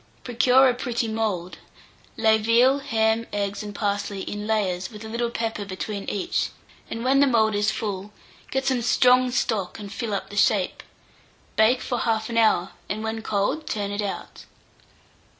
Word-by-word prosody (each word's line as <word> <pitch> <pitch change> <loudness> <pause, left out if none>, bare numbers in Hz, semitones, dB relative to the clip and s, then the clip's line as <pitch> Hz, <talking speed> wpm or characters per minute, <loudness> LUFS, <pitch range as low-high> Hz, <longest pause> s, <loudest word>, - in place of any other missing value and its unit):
Procure 250 +2 +4
a 250 - +3
pretty 240 -2 -2
mould; 210 -5 -2 0.6
lay 220 -1 +4
veal, 240 +5 +4
ham, 225 -2 +1
eggs, 200 0 -2
and 205 -1 -7
parsley 200 -1 -2
in 205 0 -5
layers, 190 -5 0
with 215 -1 -10
a - - -6
little 235 +2 -1
pepper 225 -3 -3
between 200 +1 -5
each, 200 - -1 0.4
and 230 0 -4
when 265 +2 +3
the 285 - +5
mould 220 -4 +3
is 205 +1 +2
full, 205 -1 -4 0.4
get 265 0 -1
some 260 -3 +1
strong 250 +2 +4
stock, 220 -6 -1
and 205 -1 -8
fill 220 -4 -3
up 195 - -5
the - - -8
shape. 200 -3 +2 0.7
Bake 230 +4 +4
for 245 -2 -2
1/2 225 0 -1
hour, 215 -5 +3 0.2
and 215 +2 -3
when 220 0 -3
cold, 215 +10 -1
turn 205 -2 -2
it 205 +1 -2
out. 200 -2 -6
220 Hz, 170 wpm, -24 LUFS, 205-235 Hz, 0.7 s, the